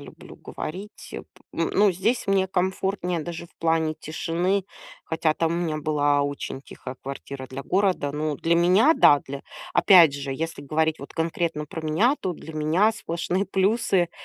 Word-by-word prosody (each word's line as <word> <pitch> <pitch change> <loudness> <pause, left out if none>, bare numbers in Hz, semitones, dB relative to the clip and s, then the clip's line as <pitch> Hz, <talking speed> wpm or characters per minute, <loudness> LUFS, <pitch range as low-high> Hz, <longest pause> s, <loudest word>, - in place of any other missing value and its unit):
люблю - - -13
говорить, 190 +7 -8
э, - - -5
п - - -24 0.3
ну - - -1
ну, 205 -1 +4
здесь 210 +8 0
мне 195 -1 +2
комфортнее 185 -1 -1
даже 170 +1 -6
в - - -31
плане 160 -1 +1
тишины. 175 +5 -1 0.4
Хотя 160 -1 +1
там 165 +1 0
у - - -1
меня 160 -3 -1
была 145 -1 +1
очень 140 -1 -4
тихая 130 -1 -9
квартира, 135 0 -7
для 135 +2 -7
города. 185 -5 0
Ну, 150 0 -2
для 165 +4 +1
меня, 185 - +5
да. 145 - +6
Для 140 +1 -6 0.3
опять 175 -7 +7
же, 140 -1 -5
если 160 +2 -4
говорить 155 +2 0
вот 140 - -11
конкретно 165 -1 -1
про 155 +2 -7
меня, 165 - +2
то 185 -2 -2
для 160 - -10
меня 160 +8 +2
сплошные 185 -1 -2
плюсы. 195 -2 +1
165 Hz, 175 wpm, -24 LUFS, 150-190 Hz, 0.4 s, опять